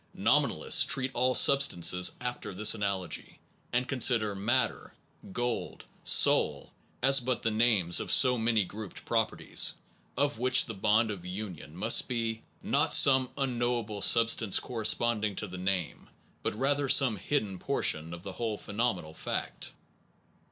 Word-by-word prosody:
Nominalists - - +3
treat 130 -1 -1
all 125 +1 0
substances 90 -10 +3
after 125 -5 -6
this 105 +3 +3
analogy, 100 -6 -5 0.3
and 125 +1 -2
consider 120 -6 +1
matter, 120 +6 -2 0.4
gold, 120 - -5 0.2
soul, - - +3 0.3
as 135 +1 +4
but 125 -1 -3
the 115 - 0
names 110 -6 +2
of - - -4
so 125 -2 +5
many 115 -2 0
grouped 105 +1 -10
properties, - - +1 0.4
of 140 -4 -1
which 130 +1 +3
the 115 - -7
bond 110 +2 0
of 95 -4 -8
union 90 -4 -9
must 110 +5 +3
be, 115 -3 -4 0.2
not - - +2
some 130 -2 +4
unknowable 120 -5 -3
substance 115 -2 +3
corresponding 110 -2 -1
to 105 - -5
the 95 -2 -9
name, 95 -4 -4 0.3
but - - -4
rather 140 +3 -1
some 130 -5 +4
hidden 100 -4 -3
portion 80 -1 -1
of 85 0 -10
the 95 - -7
whole 110 -1 -4
phenomenal 100 -8 -4
fact. - - -6
115 Hz, 135 wpm, -28 LUFS, 100-125 Hz, 0.4 s, so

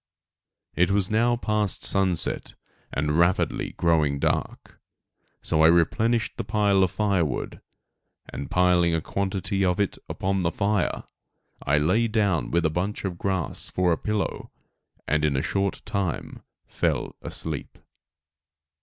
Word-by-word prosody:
It 90 +1 +3
was 100 -1 +1
now 120 +2 +3
past 105 -4 -1
sunset 95 -4 +1 0.4
and 75 +3 0
rapidly 85 +3 +1
growing 80 -4 +2
dark; - - -2 0.6
so 80 - +1
I 80 - +7
replenished 110 +8 +2
the - - -2
pile 105 -2 +2
of 95 - +3
firewood, 95 - -1 0.7
and 70 - -7
piling 90 -2 +3
a 80 - -1
quantity 95 +2 -2
of 90 0 +1
it 100 - -1
upon 95 0 -1
the 85 -1 0
fire, 105 -2 0 0.6
I 70 +2 +2
lay 95 +11 +2
down 105 -6 +1
with 85 0 +1
a 80 - +2
bunch 95 +6 -3
of 90 -3 -4
grass 95 -5 -2
for 90 -1 +1
a 85 - +2
pillow, 105 -2 -2 0.6
and 75 0 +1
in 75 -2 +2
a 65 - 0
short 100 0 -1
time 95 -6 -3 0.2
fell - - -2
asleep. 75 -4 -4
95 Hz, 135 wpm, -25 LUFS, 85-100 Hz, 0.7 s, I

